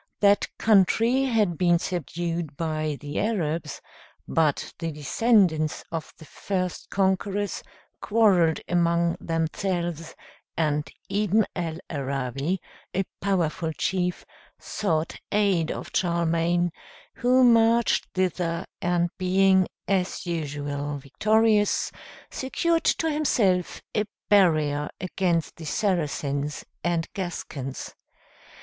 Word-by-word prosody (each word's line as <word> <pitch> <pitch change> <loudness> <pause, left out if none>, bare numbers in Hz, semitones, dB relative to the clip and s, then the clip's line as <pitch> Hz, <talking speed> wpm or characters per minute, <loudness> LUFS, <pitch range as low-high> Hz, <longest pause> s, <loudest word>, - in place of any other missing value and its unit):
That 205 0 +4
country 225 +5 +4
had 210 - +1
been 175 -1 +4
subdued 170 -2 -3
by 155 -2 -2
the 145 +1 -4
Arabs, 165 -8 -1 0.5
but 155 -3 +1
the 165 -1 -2
descendants 160 - +2
of 165 -2 -4
the 160 - -13
first 185 +2 -3
conquerors 195 +1 0 0.4
quarrelled 195 -7 +3
among 170 -1 +2
themselves, 165 0 -2 0.4
and 150 -2 0 0.2
Ibn 205 +1 +2
al 165 -3 -3
Arabi, 140 +4 -2 0.4
a 195 - +2 0.2
powerful 170 -4 0
chief, 180 +1 -1 0.3
sought 165 -6 -2
aid 195 -6 +2
of - - -6
Charlemagne, 170 0 +1 0.5
who 255 0 +4
marched 230 -1 +4
thither, 175 -2 -1 0.2
and 175 -1 +1
being, 190 0 +4 0.2
as 190 -1 0
usual, 145 -3 -3
victorious, 210 +9 +2 0.4
secured 330 +5 0
to 325 - +2
himself 205 - +1
a 210 - +2 0.2
barrier 155 -7 +3
against 175 -3 -1
the 160 - -8
Saracens 150 -6 -1 0.2
and 170 -1 0
Gascons. 150 -7 -5
175 Hz, 100 wpm, -25 LUFS, 160-200 Hz, 0.5 s, That